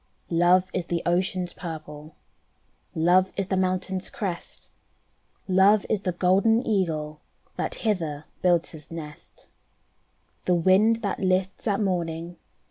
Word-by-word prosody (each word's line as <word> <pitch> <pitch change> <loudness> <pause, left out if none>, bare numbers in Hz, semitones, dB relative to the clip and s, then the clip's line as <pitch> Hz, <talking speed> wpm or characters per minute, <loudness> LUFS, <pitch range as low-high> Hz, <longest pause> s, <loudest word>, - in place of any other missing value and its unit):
Love 180 +2 +4
is 180 -2 -2
the 170 -1 -2
ocean's 180 0 0
purple, 155 -2 -8 0.8
Love 180 +3 +3
is 195 -1 -2
the 190 - +1
mountain's 185 0 -1
crest, 190 -6 -6 0.8
Love 195 +2 +4
is 210 - +1
the 185 - -1
golden 195 +7 +2
Eagle 155 -7 -1 0.3
That - - -2
hither 160 -9 -2 0.2
builds 175 -2 +2
his 155 -2 -9
nest. 155 -3 -10 1.0
The 180 - +3
wind 205 +7 +3
that 200 - -2
lists 185 +3 0
at 200 -1 +1
morning. 170 -3 -2
185 Hz, 125 wpm, -25 LUFS, 165-190 Hz, 1.0 s, Love